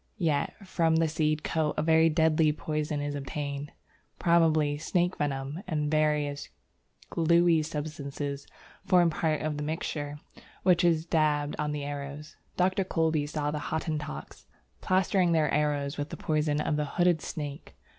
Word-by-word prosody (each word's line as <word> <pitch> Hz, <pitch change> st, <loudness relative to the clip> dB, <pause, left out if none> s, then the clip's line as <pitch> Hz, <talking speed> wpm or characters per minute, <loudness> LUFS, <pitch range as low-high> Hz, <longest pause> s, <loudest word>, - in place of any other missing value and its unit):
Yet 160 Hz, -7 st, 0 dB
from 165 Hz, -3 st, +2 dB
the 165 Hz, 0 st, +3 dB
seed 155 Hz, -1 st, 0 dB
coat 155 Hz, -2 st, 0 dB
a -, -, +1 dB
very 160 Hz, 0 st, +5 dB
deadly 160 Hz, -1 st, +3 dB
poison 150 Hz, -1 st, -2 dB
is 145 Hz, 0 st, -3 dB
obtained; 140 Hz, +1 st, -4 dB, 0.5 s
probably 160 Hz, -4 st, +3 dB
snake 175 Hz, +3 st, 0 dB
venom 140 Hz, +2 st, -2 dB
and 150 Hz, -3 st, -1 dB
various 150 Hz, -2 st, 0 dB, 0.6 s
gluey 170 Hz, 0 st, +4 dB
substances 145 Hz, -2 st, -5 dB, 0.4 s
form 180 Hz, -3 st, +4 dB
part 155 Hz, -1 st, 0 dB
of 155 Hz, -1 st, -2 dB
the 150 Hz, -, -3 dB
mixture, 150 Hz, -1 st, -4 dB, 0.4 s
which 180 Hz, -2 st, +4 dB
is 165 Hz, -2 st, +3 dB
daubed 150 Hz, -3 st, +1 dB
on 150 Hz, 0 st, -1 dB
the 150 Hz, -1 st, -3 dB
arrows. 145 Hz, +1 st, -6 dB, 0.2 s
Dr. 185 Hz, +2 st, +2 dB
Kolbe 160 Hz, -5 st, 0 dB
saw 150 Hz, -1 st, -2 dB
the 150 Hz, -, -3 dB
Hottentots 150 Hz, -, -4 dB, 0.3 s
plastering 185 Hz, -1 st, +2 dB
their 155 Hz, -3 st, +2 dB
arrows 145 Hz, -1 st, 0 dB
with 145 Hz, +1 st, -3 dB
the -, -, -7 dB
poison 150 Hz, -1 st, 0 dB
of 150 Hz, 0 st, 0 dB
the 150 Hz, -, 0 dB
hooded 175 Hz, -3 st, +3 dB
snake. 145 Hz, -2 st, -6 dB
155 Hz, 145 wpm, -28 LUFS, 145-165 Hz, 0.6 s, very